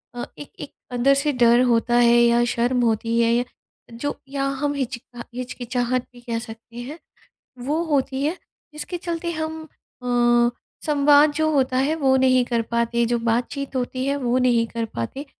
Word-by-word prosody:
अ, 240 - -4
एक 290 - -10
एक - - -7 0.2
अंदर 250 +3 +3
से 285 +2 +1
डर 240 -1 +5
होता 235 0 +2
है 240 0 +5
या 235 0 +4
शर्म 245 +1 0
होती 230 +1 0
है 230 - +3
य 245 +1 +1 0.5
जो 285 +5 -3
या 275 0 -2 0.2
हम 290 -1 0
हिच 260 -3 -3 0.4
हिचकिचाहट 250 0 -2
भी 245 - -15
कह 235 -1 -3
सकते 225 +1 -11
हैं। 270 +6 -7 0.7
वो 310 +4 0
होती 275 -3 0
है 315 +5 0 0.4
जिसके 305 +4 -5
चलते 340 0 -3
हम 315 0 -4 0.4
अ, 240 -1 +3 0.4
संवाद 295 0 +5
जो 315 +1 +1
होता 260 -3 +1
है 280 +4 +1
वो 270 -4 +3
नहीं 255 -1 +4
कर 235 -1 0
पाते, 235 +1 0
जो 240 0 0
बातचीत 245 +4 -2
होती 255 +1 -2
है 280 - 0
वो 250 -2 0
नहीं 240 -2 +3
कर 230 0 -4
पाते 190 - -5
250 Hz, 175 wpm, -22 LUFS, 235-280 Hz, 0.7 s, डर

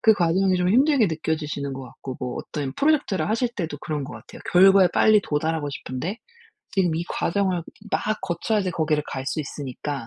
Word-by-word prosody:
그 220 - +6
과정이 185 +1 +2
좀 180 0 +1
힘들게 260 +2 +4
느껴지시는 155 -4 -2
것 135 0 -6
같고 130 +1 -8
뭐 125 -1 -3
어떤 140 -3 -4
프로젝트를 275 - +1
하실 230 +3 +1
때도 165 -8 -4
그런 150 -1 -3
것 140 - -8
같아요. 110 +2 -12
결과에 190 +1 +7
빨리 215 -1 +5
도달하고 155 -2 -1
싶은데 140 - -5 0.5
지금 180 -5 +2
이 165 - -1
과정을 185 -1 0 0.3
막 215 0 0
거쳐야지 190 +2 0
거기를 155 -3 0
갈 130 0 -5
수 155 - -1
있으니까 140 -2 -5
165 Hz, 395 characters per minute, -24 LUFS, 145-195 Hz, 0.5 s, 결과에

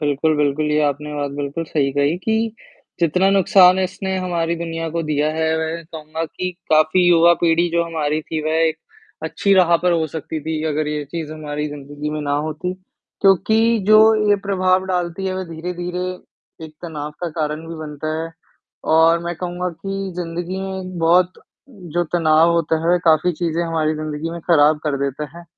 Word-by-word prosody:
बिल्कुल, 150 +1 +1
बिल्कुल, 150 +1 +1
ये 150 0 +2
आपने 150 +1 -1
बात 145 -1 -2
बिल्कुल 145 +4 -3
सही 145 -3 0
कही 145 +3 +1
कि, 220 +2 -1 0.5
जितना 175 +3 +3
नुकसान 190 -1 +5
इसने 190 0 -2
हमारी 170 -2 -1
दुनिया 165 -1 -4
को 170 - 0
दिया 150 -1 0
है, 160 0 0
वह 160 +1 -3
कहूँगा 160 +1 -5
कि 180 +3 -4 0.2
काफ़ी 155 +4 +4
युवा 170 0 +6
पीढ़ी 170 +1 +3
जो 170 0 +2
हमारी 155 -2 -1
थी, 160 +1 -4
वह 155 +1 +1
एक 160 0 -1 0.5
अच्छी 200 - 0
राह 175 -3 +5
पर 180 -1 +3
हो 165 -2 +1
सकती 160 +1 -5
थी, 155 +1 -3
अगर 150 +1 -1
ये 150 -1 -3
चीज़ 155 +1 -6
हमारी 150 -1 -4
ज़िंदगी 145 +1 -6
में 155 0 -3
ना 145 -1 -1
होती, 165 +4 -4 0.5
क्योंकि 195 +3 +4 0.3
जो 215 0 +7 0.3
ये 205 - +5
प्रभाव 185 -1 +2
डालती 180 0 -2
है, 185 - -2
वह 185 0 -3
धीरे-धीरे, 180 +2 -4 0.6
एक 155 - -11
तनाव 150 -3 -5
का 175 - -2
कारण 155 +1 -2
भी 165 - -6
बनता 155 +1 -4
है। 165 - -6 0.6
और 165 +1 +5
मैं 175 0 -3
कहूँगा 180 +1 -3
कि 195 +3 -5
ज़िंदगी 175 +2 -4
में 190 0 -4
एक 185 -1 -7
बहुत 175 +2 +3 0.6
जो 175 - +2
तनाव 165 -1 +4
होता 165 -1 +1
है, 180 - +4
काफ़ी 160 +2 +4
चीज़ें 165 0 -1
हमारी 160 -2 0
ज़िंदगी 155 +1 -4
में 170 0 -6
ख़राब 150 -1 +5
कर 150 -2 0
देता 140 +2 -3
है, 175 - -12
165 Hz, 185 wpm, -20 LUFS, 155-180 Hz, 0.6 s, जो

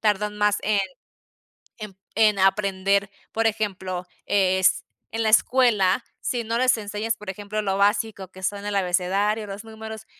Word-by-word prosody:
tardan 210 -1 0
más 210 0 +2
en 210 0 +2 1.0
en 210 -3 -8 0.2
en 215 -2 +4
aprender, 195 0 +2 0.2
por 225 0 +1
ejemplo, 190 -4 -3 0.2
es 190 -2 +3 0.3
en 225 0 -1
la 220 - +2
escuela, 230 -3 +4 0.2
si 240 -2 -2
no 230 +1 -1
les 255 0 +4
enseñas, 210 +1 -2
por 210 -2 -9
ejemplo, 205 +2 -4
lo 195 -1 0
básico 205 -1 +1
que 190 0 -13
son 200 +1 -2
el 205 - -2
abecedario, 195 +3 +1
los 200 +2 -7
números, 220 -1 -9
205 Hz, 155 wpm, -24 LUFS, 195-220 Hz, 1.0 s, en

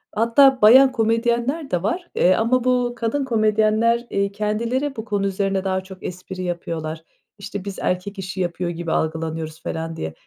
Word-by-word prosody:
Hatta 255 +4 +4
bayan 260 +5 +8
komedyenler 235 +6 0
de 180 -1 0
var, 345 - -2
eee, 185 - +4
ama 235 +2 +1
bu 250 -1 +1
kadın 240 +4 -1
komedyenler, 220 0 +2
iii, 200 0 0
kendileri 230 +7 -2
bu 220 - -6
konu 205 -2 -1
üzerine 195 0 -1
daha 190 -1 -1
çok 190 0 -12
espri 185 +1 -6
yapıyorlar. 165 -2 -4 0.3
İşte, 200 0 -7
biz 200 -2 -6
erkek 185 +2 -2
işi 190 0 -5
yapıyor 175 0 -2
gibi 170 -1 -4
algılanıyoruz 160 0 -2
falan 165 0 -4
diye. 80 - -5
205 Hz, 165 wpm, -22 LUFS, 180-235 Hz, 0.3 s, bayan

